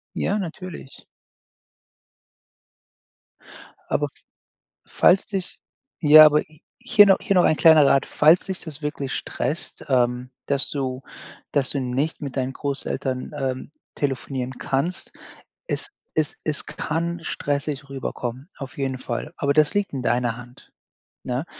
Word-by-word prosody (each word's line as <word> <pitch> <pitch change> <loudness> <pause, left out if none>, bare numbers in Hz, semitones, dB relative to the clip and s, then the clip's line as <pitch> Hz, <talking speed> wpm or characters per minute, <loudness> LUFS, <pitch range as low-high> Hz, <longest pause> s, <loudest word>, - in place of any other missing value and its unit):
Ja, 205 - 0
natürlich. 175 -5 -8 2.9
Aber - - +1 0.8
falls 190 - +4
dich 195 -3 -4 0.4
ja, 155 -1 +10
aber 150 0 +4 0.4
hier 205 -1 +6
noch 195 -1 +6
hier 200 - 0
noch 180 - +5
ein 155 - +4
kleiner 155 -3 +7
Rat. 135 - +4
Falls 155 +4 +4
dich 190 -2 -5
das 155 -2 -8
wirklich 145 -2 -3
stresst, 155 - -4
ähm, 125 -1 +1 0.2
dass 140 -1 0
du 130 -2 -3 0.5
dass 140 -3 +1
du 140 - 0
nicht 130 +5 -2
mit 140 -2 -5
deinen 130 0 -1
Großeltern, 135 -2 -3
ähm, 130 -1 -3 0.2
telefonieren 130 -2 -3
kannst, 150 +7 -2 0.6
es - - -2 0.3
es 155 -2 0
es 155 -1 -2
kann 170 +2 -3
stressig 145 -1 -3
rüberkommen, 130 +1 -5
auf 135 -1 -8
jeden 135 -1 -1
Fall. 130 +5 -4
Aber 140 0 +1
das 150 0 +3
liegt 205 -4 0
in 135 - -3
deiner 120 -1 0
Hand. 125 0 -14 0.5
Ne? 125 +6 -2
140 Hz, 130 wpm, -23 LUFS, 130-155 Hz, 2.9 s, ja